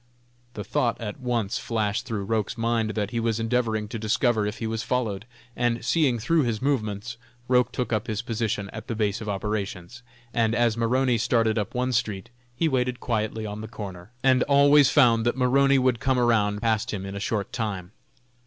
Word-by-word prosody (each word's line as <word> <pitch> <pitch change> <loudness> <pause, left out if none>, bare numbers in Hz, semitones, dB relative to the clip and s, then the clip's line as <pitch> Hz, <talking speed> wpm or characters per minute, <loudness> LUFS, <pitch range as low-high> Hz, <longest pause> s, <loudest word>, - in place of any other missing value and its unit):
The 105 - -4
thought 120 +2 0
at 110 +2 -6
once 120 -5 -1
flashed 110 +1 -2
through 110 -5 -3
Roch's 110 +2 -1
mind 115 -1 0
that 105 -2 -2
he 115 - -1
was 115 -1 0
endeavoring 115 -2 0
to 115 0 -5
discover 110 0 +1
if 105 - -4
he 115 - -4
was 110 0 -2
followed; 115 -3 -2 0.3
and, 120 -1 0
seeing 135 -2 +2
through 160 +8 +2
his 115 -5 -1
movements, 120 -4 -2 0.3
Roch 125 -1 +3
took 125 -2 -2
up 110 -1 -1
his 110 0 -2
position 110 -4 -2
at - - -8
the 115 - -3
base 105 -2 -1
of 105 - -5
operations, 100 +1 -4 0.3
and, 115 -1 +1
as 120 -2 +2
Maroney 120 +1 +1
started 115 -1 +2
up 105 - -4
one 125 +1 0
street, 110 -4 -2 0.2
he 160 - +1
waited 125 -3 0
quietly 110 -2 -2
on 105 0 -5
the 110 - -6
corner, 95 -4 -8
and 130 -1 +4
always 140 0 +6
found 115 -2 +4
that 120 +2 0
Maroney 135 +2 +4
would 130 -3 +2
come 130 +1 +1
around 110 -3 +2
past 110 -2 +1
him 95 -2 -4
in 95 - -6
a 100 - -5
short 105 0 -2
time. 100 -7 -3
115 Hz, 195 wpm, -25 LUFS, 105-125 Hz, 0.3 s, always